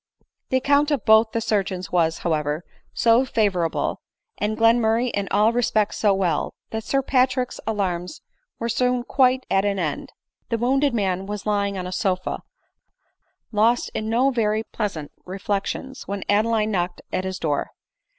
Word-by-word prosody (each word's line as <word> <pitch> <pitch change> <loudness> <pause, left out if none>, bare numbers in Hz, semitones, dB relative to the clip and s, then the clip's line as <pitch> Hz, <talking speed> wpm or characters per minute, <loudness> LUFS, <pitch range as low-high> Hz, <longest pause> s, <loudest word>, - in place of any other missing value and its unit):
The 260 - +2
account 285 +3 +3
of 285 -8 -1
both 220 +1 +6
the 230 - -1
surgeons 195 -5 -1
was, 165 -2 +2
however, 155 -1 0 0.3
so 235 +2 +4
fa 220 -5 +1
vorable, 170 -3 -1 0.4
and 215 +1 -1
Glenmurray 230 +1 +3
in 200 -1 -2
all 210 +3 +3
respects 215 -3 +1
so 210 - +4
well, 190 -3 0 0.2
that 220 0 -3
Sir 275 +3 0
Patrick's 255 -1 +1
alarms 180 -5 -2 0.4
were 230 - -3
soon 250 +1 +1
quite 260 0 +2
at 195 - +3
an 200 -1 0
end; 160 -6 -3
and - - -21 0.4
the 230 - 0
wound 260 +4 +1
ed 280 -4 +2
man 190 -3 -1
was 205 -1 -5
lying 200 -2 0
on 180 - -4
a 180 - -5
sofa, 185 -1 -1 1.1
lost 225 +3 +2
in 215 0 -3
no 250 +4 +3
very 220 -3 0
pleasant 180 -9 -3
re 185 +1 -7
flections, 210 +6 -3
when 200 0 -3
Adeline 215 +1 +2
knocked 180 -2 -2
at 185 - 0
his 190 0 -3
door. 150 -5 -1
215 Hz, 170 wpm, -23 LUFS, 190-235 Hz, 1.1 s, both